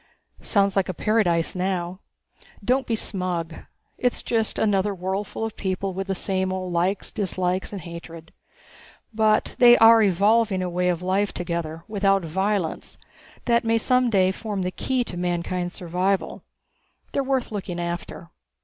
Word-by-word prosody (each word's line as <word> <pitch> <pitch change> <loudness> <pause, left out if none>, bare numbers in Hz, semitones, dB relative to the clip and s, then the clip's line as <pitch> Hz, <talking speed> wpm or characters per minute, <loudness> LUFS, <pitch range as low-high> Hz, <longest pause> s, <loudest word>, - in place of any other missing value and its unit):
"Sounds 200 -3 +2
like 195 -2 +1
paradise 185 -7 +1
now." 180 -1 -2 0.7
"Don't 255 +2 +1
be 230 - +1
smug. 180 -6 -2 0.5
It's 250 -1 +1
just 225 -2 0
another 205 -1 +1
worldful 190 +4 -3
of 225 - -6
people 190 0 -2
with 195 +1 -4
the 195 - -1
same 190 0 -1
old 185 -1 -4
likes, 180 +4 0
dislikes 185 -3 -1
and 200 -3 -6
hatreds. 165 -1 -9 0.8
But 215 -1 +2
they 240 -1 +8
are 225 0 +7
evolving 200 0 +3
a 180 - -3
way 180 +1 +1
of 175 0 -1
living 195 +2 0
together, 170 -2 -4
without 195 -3 +1
violence, 190 +1 -2 0.5
that 235 0 +3
may 230 0 +2
some 250 +2 +2
day 190 -4 +3
form 205 -1 -4
the 180 - -2
key 255 +5 -1
to 180 - -7
mankind's 175 0 -2
survival. 185 +2 -1 0.7
They - - -1
are - - +1
worth 265 -3 -1
looking 190 -4 -4
after. 170 0 -5
190 Hz, 150 wpm, -24 LUFS, 180-215 Hz, 0.8 s, they